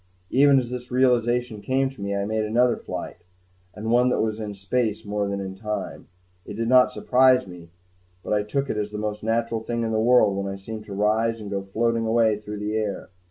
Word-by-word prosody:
Even 140 +1 +5
as 125 -2 -1
this 125 0 -6
realization 125 -3 +1
came 135 +3 +1
to 135 - -13
me, 100 0 -2
I 100 0 -1
made 110 +1 -1
another 120 +3 +2
flight - - -7 0.6
and 110 +2 -3
one 125 +1 +4
that - - 0
was 110 0 -1
in 105 -2 -5
space 105 +2 -1
more 105 0 -1
than 100 0 -3
in 95 -1 -5
time. 105 +1 -5 0.4
It - - -8
did 115 +1 -2
not 125 +1 +5
surprise 130 0 +3
me, 90 -3 -12 0.5
but - - -2
I 105 - +2
took 135 +7 -2
it 110 - -3
as 105 0 -2
the 105 - -6
most 105 0 -4
natural 115 0 0
thing 115 +1 -3
in 115 - -1
the 110 - +1
world 115 -4 +4
when 100 0 -3
I - - -5
seemed 110 +2 -8
to 100 - -8
rise 110 +3 +1
and 105 -2 -8
go 100 -1 -1
floating 115 +3 -1
away 110 -2 +2
through 105 0 -7
the 105 +1 -3
air. 105 -4 -3
110 Hz, 225 wpm, -24 LUFS, 105-120 Hz, 0.6 s, Even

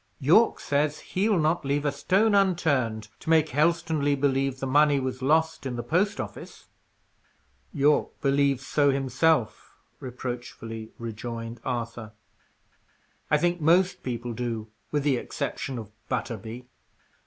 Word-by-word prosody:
Yorke 170 - +4
says 145 +1 0
he'll 200 +2 0
not 160 +2 +1
leave 140 +1 -1
a 145 - +2
stone 190 +10 +2
unturned 140 - +1
to - - -7
make 160 -1 +4
Helstonleigh 155 -1 +1
believe 135 -1 +1
the 135 - -3
money 145 +1 +4
was 130 0 -4
lost 160 +4 +2
in 130 -2 -4
the 120 - -4
post 200 +5 +1
office." - - -8 1.0
"Yorke 145 +1 +1
believes 140 -1 +1
so 145 0 +2
himself," 135 -1 0 0.2
reproachfully 120 -3 -6
rejoined 115 0 -6
Arthur. 115 -3 -4 1.2
"I 150 - +4
think 175 +2 0
most 180 +3 +3
people 120 -1 -4
do, 115 -2 -4 0.2
with 145 -2 -1
the 140 -3 +2
exception 130 +2 -4
of 110 -2 -8 0.2
Butterby. 115 +1 -4
140 Hz, 130 wpm, -26 LUFS, 120-160 Hz, 1.2 s, Yorke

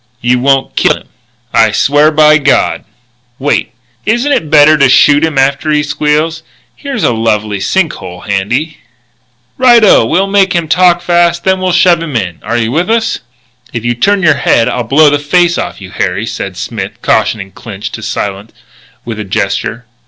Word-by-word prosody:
"You 125 +1 +1
won't 135 +1 0
kill - - +2
him?" - - -18 0.4
"I 115 -1 +3
swear 145 +7 +2
by 155 0 +4
God 140 -1 0 0.3
" 120 0 -43
"Wait! - - 0 0.3
Isn't 240 +7 0
it 160 - 0
better 155 0 +5
to 140 -2 +4
shoot 145 +3 +4
him 160 -3 -1
after 140 +3 0
he 150 -1 +1
squeals? 150 +2 -1 0.3
Here's 275 - -5
a 125 - +2
lovely 110 -2 -1
sink 160 - 0
hole 90 -1 -10
handy." 120 +11 -3 0.8
"Right 240 -3 +5
o! 200 - +5
We'll 170 +12 +1
make 195 -1 +1
him 170 -2 -1
talk 175 +1 +3
first 170 0 +1
and 190 0 +1
then 185 0 0
shove 175 -1 +3
him 155 -5 -6
in. 90 -7 -3
Are 120 - -3
you 115 -1 -1
with 170 - -1
us?" 225 0 0 0.5
"If 115 -1 -5
you 120 - +1
turn 195 - 0
your 155 -4 +3
head 115 0 +2
I'll 125 - -2
blow 145 +5 +4
the 145 - +1
face 175 +4 +1
off - - -5
you, 95 -2 -11
Harry," 95 +3 -2
said 100 -5 -6
Smith, - - -6
cautioning 100 -3 0
Clinch 105 -1 -8
to 110 - -8
silence 105 -1 -5 0.5
with 115 -2 -6
a - - -3
gesture. 105 +4 -3
145 Hz, 185 wpm, -11 LUFS, 115-170 Hz, 0.8 s, better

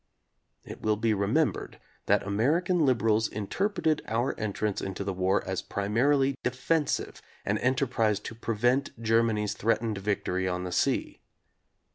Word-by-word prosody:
It - - -10
will 110 0 +2
be 110 +1 +1
remembered 105 +11 0 0.3
that - - +3
American 150 - +1
liberals 115 -3 +2
in 105 -1 -5
terpreted 175 - 0
our 115 +4 0
entrance 105 -1 -2
into 95 0 -4
the 100 0 -2
war 95 +1 +1
as - - -2
primarily 135 +7 +1
defensive, 135 +4 -1 0.2
an 105 +1 0
enterprise 125 -5 +1
to 115 - -7
prevent 120 +3 0
Germany's 115 -2 +1
threatened 110 -1 0
victory 95 -2 -1
on 90 0 -2
the 90 - -4
sea. 90 - 0
115 Hz, 135 wpm, -28 LUFS, 100-130 Hz, 0.3 s, that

